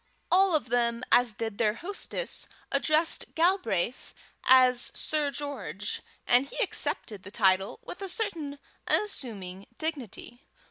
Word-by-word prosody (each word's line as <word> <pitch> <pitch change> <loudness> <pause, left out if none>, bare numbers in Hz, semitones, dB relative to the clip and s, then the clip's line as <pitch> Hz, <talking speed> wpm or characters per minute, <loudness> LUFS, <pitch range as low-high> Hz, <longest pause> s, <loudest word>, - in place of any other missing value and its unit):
All 375 -1 +5
of 290 -8 -1
them, 235 0 +1
as 245 -3 +4
did 225 -1 -4
their 215 -2 +2
hostess, 405 - -3 0.2
addressed 315 +1 +1
Galbraith 325 - 0 0.3
as 255 -1 +5
Sir 300 -2 0
George, 215 - -5 0.2
and 250 +3 +4
he - - -10
accepted 210 -4 -2
the 190 - -10
title 195 - +2
with - - -8
a 390 - -2
certain 335 -9 -1 0.3
unassuming 200 - 0
dignity. 265 - -5
250 Hz, 125 wpm, -28 LUFS, 215-315 Hz, 0.3 s, All